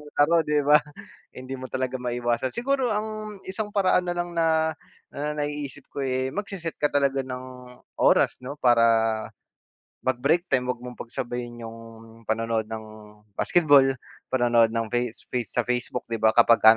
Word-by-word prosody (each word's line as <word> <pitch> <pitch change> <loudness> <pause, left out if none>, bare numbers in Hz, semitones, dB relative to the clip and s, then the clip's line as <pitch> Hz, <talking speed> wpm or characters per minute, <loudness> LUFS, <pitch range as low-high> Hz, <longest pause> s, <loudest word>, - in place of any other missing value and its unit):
laro 165 +4 +4
'di 150 -1 +2
ba. 150 +1 +6 0.6
hindi 130 +1 -6
mo 130 - -6
talaga 130 0 -2
maiwasan. 120 0 -1
Siguro 260 0 0
ang 215 -1 -4
isang 205 +2 -4
paraan 190 -2 +3
na 175 - -1
lang 175 0 -3
na 160 -1 +2 0.4
na 150 +1 -3
naiisip 145 -2 -4
ko, - - -6
eh, 130 0 -1
magse-set 195 -4 -5
ka 150 - +3
talaga 140 -1 +1
ng 125 -1 -9 0.2
oras - - +4
'no. 130 +3 -7
Para 120 -5 +4 1.2
mag-break 140 +7 +2
time 125 -6 0
wag 125 - -1
mong 125 0 -8
pagsabayin 120 0 -5
yung 115 0 -8 0.5
panonood 110 0 0
ng 110 -1 -6 0.5
basketball, 145 - +5 0.5
panonood 120 -3 +4
ng 115 0 -1
face 120 -1 -2
face 120 -4 -1
sa 120 - -1
Facebook 125 0 -2
'di 115 -1 -4
ba 110 - +6
kapag 115 0 +5
ka 110 - +9
130 Hz, 155 wpm, -25 LUFS, 120-160 Hz, 1.2 s, ka